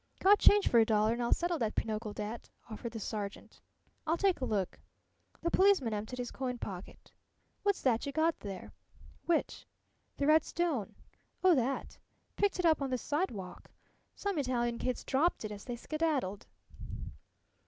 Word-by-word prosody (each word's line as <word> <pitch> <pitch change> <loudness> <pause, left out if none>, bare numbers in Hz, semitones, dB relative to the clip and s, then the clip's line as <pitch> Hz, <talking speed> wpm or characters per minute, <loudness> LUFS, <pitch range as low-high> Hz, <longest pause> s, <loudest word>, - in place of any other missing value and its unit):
"Got 405 +2 +6
change 410 -1 +6
for 235 - +5
a - - +7
dollar, 215 0 +3
an' 240 - -3
I'll 235 - 0
settle 345 -1 +1
that 220 -2 -1
pinochle 215 0 -2
debt," 210 +3 -6 0.2
offered 230 +2 -5
the 225 - -4
sergeant. 205 -1 -6 0.5
"I'll 325 +2 +2
take 380 -5 +2
a - - +1
look." 200 -6 -1 0.6
The 340 - +1
policeman 375 - +4
emptied 215 +4 -4
his 245 -1 -4
coin 255 -2 -3
pocket. 190 -5 -8 0.5
"What's 405 -1 +1
that 245 0 +2
yuh - - -2
got 320 +3 +1
there?" 195 -3 -7 0.6
"Which?" 340 -2 0 0.5
"The 280 - 0
red 310 +1 +6
stone?" 320 - -1 0.5
"Oh, 370 -1 +7
that? 265 -1 -1 0.4
Picked 405 -1 +1
it 360 - 0
up 315 -3 +4
on 275 - -1
the 255 - 0
sidewalk. 235 - -3 0.5
Some 400 -6 -2
Italian 240 -3 0
kids 255 -1 -2
dropped 280 -2 +1
it 215 - -4
as 205 -1 -8
they 245 - -4
skedaddled." 270 - -1
255 Hz, 165 wpm, -32 LUFS, 220-330 Hz, 0.6 s, a